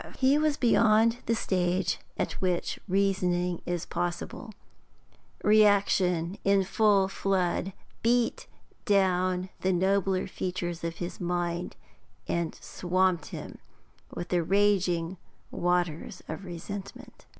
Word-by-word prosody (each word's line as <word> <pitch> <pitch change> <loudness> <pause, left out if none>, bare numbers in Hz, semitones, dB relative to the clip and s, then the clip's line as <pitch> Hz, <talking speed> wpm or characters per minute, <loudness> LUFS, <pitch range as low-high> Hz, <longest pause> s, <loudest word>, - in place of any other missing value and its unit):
He 275 +3 +4
was 305 -1 +1
beyond 230 -1 +4
the 230 - +2
stage 185 -3 0 0.2
at - - -1
which 180 -2 -1
reasoning 180 -2 +1
is 175 -1 -2
possible; 175 +6 -4 0.9
reaction, 200 -4 +3
in 200 0 +3
full 200 0 +3
flood, 190 -1 0 0.3
beat 235 0 +1 0.4
down 185 -3 +2
the 190 - +1
nobler 190 +1 +1
features 175 -2 -4
of 165 0 -3
his 175 +1 -6
mind 175 0 -2 0.5
and 170 -2 -1
swamped 180 -2 0
him - - -8 0.6
with 175 - -5
the 175 -1 +2
raging 185 -2 +1 0.3
waters 175 -2 -1
of 160 +5 -6
resentment. 190 +3 -8
185 Hz, 105 wpm, -28 LUFS, 175-200 Hz, 0.9 s, He